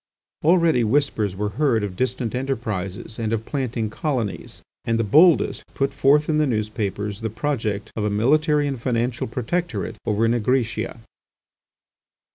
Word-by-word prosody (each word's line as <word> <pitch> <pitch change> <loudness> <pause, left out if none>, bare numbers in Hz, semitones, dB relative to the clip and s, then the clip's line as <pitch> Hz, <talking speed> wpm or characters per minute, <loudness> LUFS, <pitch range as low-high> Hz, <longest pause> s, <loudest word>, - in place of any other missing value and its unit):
Already 165 -6 +4
whispers 110 -5 +1
were 105 +2 -2
heard 120 -8 +3
of 100 -3 -4
distant 125 0 -1
enterprises, 110 -5 -4
and 110 -1 -1
of 115 -1 -1
planting 120 -6 -2
colonies, 125 -7 -3 0.2
and 115 0 0
the 115 - +1
boldest 155 - +4
put 135 0 0
forward 150 +2 +3
in 155 -1 +2
the 150 - +3
newspapers 105 -2 -2
the 110 - -2
project 110 -4 -2
of 110 - -2
a 105 - +1
military 150 +8 +2
and 135 -4 -4
financial 120 -1 -1
protectorate 125 - -3
over 110 +1 +2
Nigritia. 115 -1 0
115 Hz, 140 wpm, -23 LUFS, 110-140 Hz, 0.2 s, Already